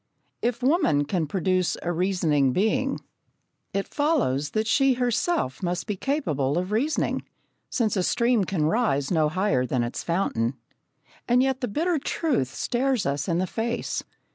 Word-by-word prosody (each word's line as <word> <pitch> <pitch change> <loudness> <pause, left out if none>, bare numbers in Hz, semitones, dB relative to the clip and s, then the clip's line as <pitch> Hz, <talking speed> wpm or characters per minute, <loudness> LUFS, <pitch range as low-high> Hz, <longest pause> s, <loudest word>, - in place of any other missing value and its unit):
If 240 +1 -1
woman 265 - +3
can 160 +1 -1
produce 185 0 0
a 175 - -1
reasoning 165 -7 +1
being, 260 - +1 0.7
it 195 0 -2
follows 240 - +1
that 215 +7 -1
she 270 +4 +3
herself 245 - 0
must 175 -2 -2
be 210 - -2
capable 160 - -1
of 185 +2 -2
reasoning, 270 +9 0 0.5
since 225 -4 0
a 190 - +1
stream 235 +3 +2
can 170 -5 0
rise 155 - +1
no 155 -3 +3
higher 185 -6 +1
than 125 -1 0
its 120 - -4
fountain. 135 -9 0 0.7
And 250 +2 +4
yet 265 0 0
the 250 - 0
bitter 320 - 0
truth 270 - -1
stares 255 -2 0
us 140 +1 -1
in 170 - +1
the 185 - +1
face. 230 +5 -2
195 Hz, 155 wpm, -25 LUFS, 155-250 Hz, 0.7 s, And